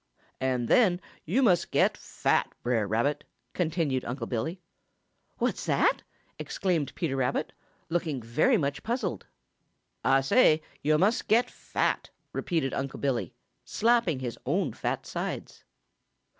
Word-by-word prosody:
"And 130 -2 0
then 185 - +4 0.3
yo' 265 - +2
must 180 -7 +3
get - - +3
fat, - - 0
Brer 115 -4 +1
Rabbit," 115 +8 0 0.3
continued 155 -6 0
Unc' 120 -1 -4
Billy. 125 +10 -2 0.8
"What's - - -1
that?" - - +3 0.4
exclaimed 175 -7 -1
Peter 160 -7 -1
Rabbit, 130 0 -1 0.3
looking 165 -5 -1
very 115 +5 +2
much 140 -2 -1
puzzled. 230 - -2 0.8
"Ah 135 +3 +4
say 155 - +4 0.2
yo' 155 +1 +3
must 210 +8 +2
get 230 +3 +3
fat," - - -1 0.2
repeated 160 -7 -1
Unc' 135 0 -3
Billy, 135 -4 -1 0.3
slapping 230 - +2
his 120 -3 -4
own - - 0
fat - - -3
sides. - - -5
145 Hz, 125 wpm, -28 LUFS, 130-180 Hz, 0.8 s, then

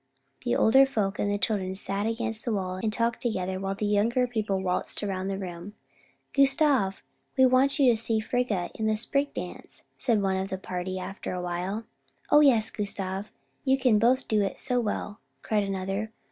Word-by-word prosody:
The 120 - +1
older 265 +4 +6
folk 210 -6 -1
and 205 - +1
children 190 -2 -1
sat 200 +2 -2
against 225 -1 -3
the 240 - -2
wall 185 -3 -2
and 220 - 0
talked 230 +1 0
together 190 -5 -2
while 195 0 -2
the 210 - -2
younger 220 +5 +2
people 215 -5 -1
waltzed 185 +2 -2
around 190 -2 -2
the 195 0 -2
room. 185 +1 -7 0.6
"Gustav, 275 -7 +3 0.3
we 260 - +7
want 255 +2 +5
to 260 -4 +5
see 225 +1 -1
you - - +3
and - - -11
Frigga 230 -8 0
in 220 - -2
the 215 - +2
Spring 275 +6 +1
Dance," - - -7 0.2
said 235 -5 +2
one 190 -1 +1
of 190 +1 -2
the 190 - -3
party 185 0 -4
after 190 +1 -5
a 180 - -3
while. 180 +5 -3 0.5
"O 295 - +8
yes, 240 -7 +4
Gustav, 200 -1 -4 0.3
you 265 -2 +3
can 250 -5 +3
both 255 +4 +3
do 215 -1 +2
it 195 - -2
so 250 -2 0
well," 210 -2 -3 0.2
cried 215 -1 +1
another. 195 +2 -3
210 Hz, 190 wpm, -27 LUFS, 190-235 Hz, 0.6 s, O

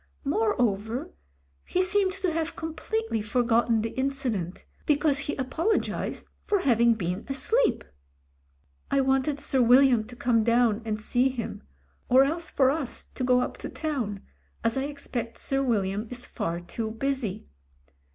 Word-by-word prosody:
Moreover, 255 - 0 0.5
he - - -2
seemed 375 +1 +3
to 380 -3 -1
have 325 0 -2
completely 325 - -3
forgotten 230 0 +2
the 225 - -2
incident, 260 - -2 0.2
because 295 -1 +3
he 290 +1 -2
apologised 315 - -1 0.2
for 410 -3 +2
having 235 -4 +4
been 180 -1 -3
asleep. 440 - +1 1.1
"I 275 - +2
wanted 270 +2 +1
Sir 265 -2 +1
William 245 -1 +6
to 245 +2 -11
come 235 -2 +2
down 235 -1 +3
and 215 -1 -2
see 245 +4 +2
him; 245 -4 -5 0.5
or 260 +2 +7
else 330 +4 -1
for 265 -1 +3
us 285 -4 -3
to 255 - -4
go 250 0 +4
up - - -4
to - - -5
town, 250 -11 -3 0.4
as 230 - +1
I 265 0 0
expect 275 -5 -5
Sir 270 0 0
Wil 235 -7 +2
liam 200 +4 -4
is 245 0 -4
far 170 +1 -3
too 220 +5 -4
busy. 225 - -3
255 Hz, 150 wpm, -27 LUFS, 225-290 Hz, 1.1 s, or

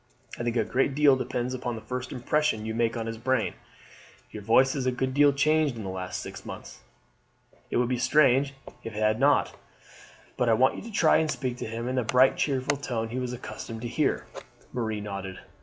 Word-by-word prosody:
I - - -3
think 120 0 -1
a 115 - +3
great 130 +5 0
deal 145 -2 +6
depends 125 -1 -2
upon 125 -2 -3
the 110 - -7
first 125 +3 -5
impression 125 -3 0
you 110 - -3
make 115 +1 0
on 115 - -3
his 115 0 -5
brain. 130 -1 0 0.8
Your 105 - -7
voice 130 +6 +4
has 130 -3 -2
a - - +3
good 130 +1 -2
deal 145 +1 +5
changed 150 0 +2
in 110 - -6
the 95 - -4
last 90 -1 -4
six - - -8
months; - - -9 0.9
it - - 0
would 120 0 +2
be 125 0 -1
strange 135 -1 +3 0.3
if 115 -2 -7
it - - -3
had 110 +1 +2
not; 145 +2 +3 0.8
but 125 - +2
I - - +5
want 130 +4 +3
you - - -6
to 230 - -9
try 170 -6 +4
and 160 - +1
speak 130 -4 -2
to - - -5
him 115 +2 -4
in 130 +1 -2
the 125 - +2
bright 125 +4 +4
cheerful 140 0 0
tone 115 -5 -3
he 125 +3 -3
was 125 -1 -3
accustomed 115 -2 -7
to - - -2
hear." - - 0 0.5
Marie 110 -3 -2
nodded. 100 -2 -6
125 Hz, 220 wpm, -27 LUFS, 115-135 Hz, 0.9 s, deal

